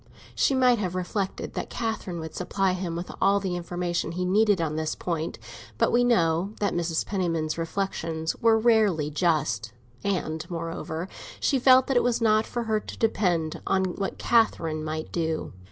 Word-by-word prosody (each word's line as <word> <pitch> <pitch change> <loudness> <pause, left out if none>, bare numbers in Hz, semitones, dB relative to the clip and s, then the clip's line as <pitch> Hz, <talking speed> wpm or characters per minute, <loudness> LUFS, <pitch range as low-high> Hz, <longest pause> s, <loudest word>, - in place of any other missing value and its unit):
She 270 - +2
might 250 -3 +4
have 185 -3 -2
reflected 190 +2 -3
that - - -4
Catherine 220 -7 -3
would 160 -1 -7
supply 190 +1 0
him 180 -2 -3
with 170 +2 -5
all 200 +1 +4
the 190 -3 -2
information 175 -1 -2
he 180 +1 -2
needed 205 +1 +3
on 155 -2 -1
this 155 0 -2
point; 165 -2 -3 0.4
but - - +2
we 245 +1 +4
know 185 -4 +2
that 205 - 0
Mrs. 170 -2 -1
Penniman's 165 -5 -1
reflexions 165 -2 -2
were 225 -1 +4
rarely 215 -10 +3
just; 140 - 0 0.3
and, 160 -5 -1
moreover, 165 0 -4 0.3
she 275 - +2
felt 255 +1 +6
that 270 - +1
it - - +4
was 245 -1 +1
not 215 -1 +3
for 240 - -3
her 220 -1 +1
to - - -9
depend 175 -8 0
on 190 0 +2
what 195 -1 -3
Catherine 165 -9 +2
might 155 0 -4
do. 160 -2 -2
180 Hz, 170 wpm, -26 LUFS, 160-215 Hz, 0.4 s, felt